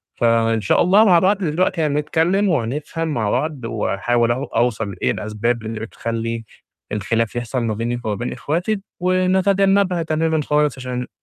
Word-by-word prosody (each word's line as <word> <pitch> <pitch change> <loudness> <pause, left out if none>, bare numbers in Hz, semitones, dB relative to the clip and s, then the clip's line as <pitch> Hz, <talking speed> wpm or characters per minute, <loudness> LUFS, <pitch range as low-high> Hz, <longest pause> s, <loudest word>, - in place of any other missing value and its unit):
ف - - -5
إن 115 -1 +3
شاء 100 - +2
الله 195 +5 +5
مع 180 -5 +6
بعض 195 +4 +3
دلوقتي 180 0 0
هنتكلِّم 160 +6 +1
وهنفهم 150 +3 -2
مع 115 -9 -1
بعض، 150 0 -2
وهاحاول 115 +2 0
أو 130 +3 -1
أوصل 115 -6 -1
لإيه - - -1
الأسباب 110 +3 -2
اللي 110 0 -4
بتخلِّي 115 +1 -4 0.5
الخلاف 110 +2 -1
يحصل 120 +1 -2
ما 110 -2 -1
بينكِ 120 +3 -3
وما 105 -1 -1
بين 120 +4 -4
إخواتكِ، 175 - -1 0.2
ونتجنبها 185 0 +2
تمامًا 160 0 0
خالص 150 -1 +1
عشان 125 -1 -4
130 Hz, 155 wpm, -20 LUFS, 115-170 Hz, 0.5 s, مع